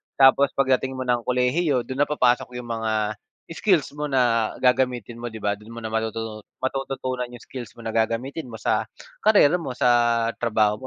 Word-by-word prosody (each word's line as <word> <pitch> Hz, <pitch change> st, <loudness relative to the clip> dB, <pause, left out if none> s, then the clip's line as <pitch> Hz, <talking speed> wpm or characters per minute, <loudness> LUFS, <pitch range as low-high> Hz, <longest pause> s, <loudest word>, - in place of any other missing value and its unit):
tapos 135 Hz, +1 st, +5 dB
pagdating 130 Hz, -1 st, +1 dB
mo 130 Hz, 0 st, -4 dB
ng 120 Hz, -2 st, 0 dB
kolehiyo, 125 Hz, +2 st, +1 dB
do'n 135 Hz, +4 st, 0 dB
na -, -, -21 dB
papasok 125 Hz, -3 st, +1 dB
'yong 125 Hz, -1 st, -7 dB
mga 110 Hz, -2 st, -1 dB, 0.3 s
skills 165 Hz, -4 st, +1 dB
mo 150 Hz, -1 st, -3 dB
na 115 Hz, -4 st, +2 dB
gagamitin 125 Hz, -3 st, +1 dB
mo, 120 Hz, -1 st, -5 dB
'di 110 Hz, -, -8 dB
ba? 105 Hz, 0 st, 0 dB
Do'n 105 Hz, +2 st, -14 dB
mo 115 Hz, -, -7 dB
na 110 Hz, -, -5 dB
matutu 110 Hz, -1 st, -3 dB, 0.2 s
matututunan 130 Hz, -2 st, -3 dB
'yong 120 Hz, -, -10 dB
skills 125 Hz, -3 st, -8 dB
mo -, -, -8 dB
na 110 Hz, 0 st, -4 dB
gagamitin 115 Hz, +7 st, -1 dB
mo 110 Hz, -1 st, -9 dB
sa -, -, +1 dB, 0.4 s
karera 180 Hz, -7 st, +6 dB
mo, 140 Hz, -6 st, -5 dB
sa 120 Hz, -1 st, +3 dB
trabaho 110 Hz, -3 st, +2 dB
125 Hz, 180 wpm, -24 LUFS, 115-135 Hz, 0.4 s, karera